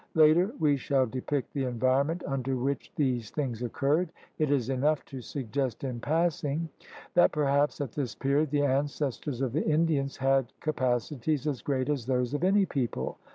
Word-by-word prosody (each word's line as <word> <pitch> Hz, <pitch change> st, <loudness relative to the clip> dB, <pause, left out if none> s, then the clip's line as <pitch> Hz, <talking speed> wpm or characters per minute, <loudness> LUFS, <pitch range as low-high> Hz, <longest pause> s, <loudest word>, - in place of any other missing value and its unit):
Later 160 Hz, +5 st, +5 dB
we 145 Hz, -2 st, +3 dB
shall 135 Hz, 0 st, +2 dB
depict 130 Hz, +3 st, -3 dB
the 140 Hz, -2 st, -1 dB
environ 130 Hz, +3 st, +2 dB
ment 165 Hz, +2 st, -3 dB
under 135 Hz, -1 st, -1 dB
which 135 Hz, +3 st, -2 dB
these 125 Hz, -6 st, 0 dB
things 125 Hz, -6 st, -3 dB
occurred; 145 Hz, +8 st, +1 dB, 0.3 s
it 155 Hz, -2 st, +2 dB
is 135 Hz, -5 st, +1 dB
enough 140 Hz, +3 st, +1 dB
to 135 Hz, -2 st, -8 dB
suggest 130 Hz, -1 st, -3 dB
in 125 Hz, -3 st, -3 dB
passing 160 Hz, +1 st, 0 dB, 0.4 s
that 175 Hz, -, +5 dB
perhaps 145 Hz, -1 st, +1 dB
at 140 Hz, -5 st, -3 dB
this 130 Hz, -5 st, -3 dB
period 140 Hz, +2 st, +1 dB
the 145 Hz, 0 st, +1 dB
ancestors 140 Hz, -1 st, -1 dB
of 130 Hz, -3 st, -1 dB
the 155 Hz, -, +1 dB
Indians 155 Hz, -3 st, +1 dB
had 135 Hz, -2 st, +2 dB
capacities 135 Hz, 0 st, -1 dB
as 145 Hz, -5 st, -1 dB
great 130 Hz, -2 st, -1 dB
as 140 Hz, -6 st, -1 dB
those 125 Hz, 0 st, 0 dB
of 145 Hz, -, -1 dB
any 195 Hz, +2 st, +4 dB
people. 120 Hz, -, -3 dB
140 Hz, 170 wpm, -29 LUFS, 130-150 Hz, 0.4 s, Later